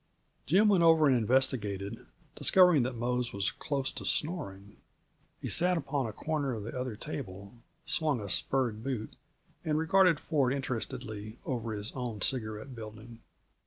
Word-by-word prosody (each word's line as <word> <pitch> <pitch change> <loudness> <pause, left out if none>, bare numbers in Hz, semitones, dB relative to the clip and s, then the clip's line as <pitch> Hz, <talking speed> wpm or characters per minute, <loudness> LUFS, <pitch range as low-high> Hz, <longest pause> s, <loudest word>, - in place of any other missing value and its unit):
Jim 195 +8 +5
went 195 -4 +5
over 165 -2 +6
and 135 -3 +5
investigated; 110 -5 0 0.3
discovering 180 -6 +5
that 125 +1 -1
Mose 120 +1 -1
was 100 0 -1
close 140 -3 -2
to - - -7
snoring, 100 - -3 0.6
he - - -5
sat 180 +1 +2
upon 140 -5 -1
a - - -4
corner 145 +1 -2
of 105 - -5
the 115 - -6
other 125 -3 -3
table, 100 -7 -7 0.3
swung 150 -6 +1
a 100 - -5
spurred 115 +2 +1
boot, 120 -5 -4 0.5
and 155 -1 0
regarded 165 0 +4
Ford 140 -5 +1
interestedly 115 -4 -4
over 115 -3 -2
his 105 +1 -1
own 120 -5 -4
cigarette 110 +1 -2
building. 110 0 -10
125 Hz, 150 wpm, -31 LUFS, 110-150 Hz, 0.6 s, over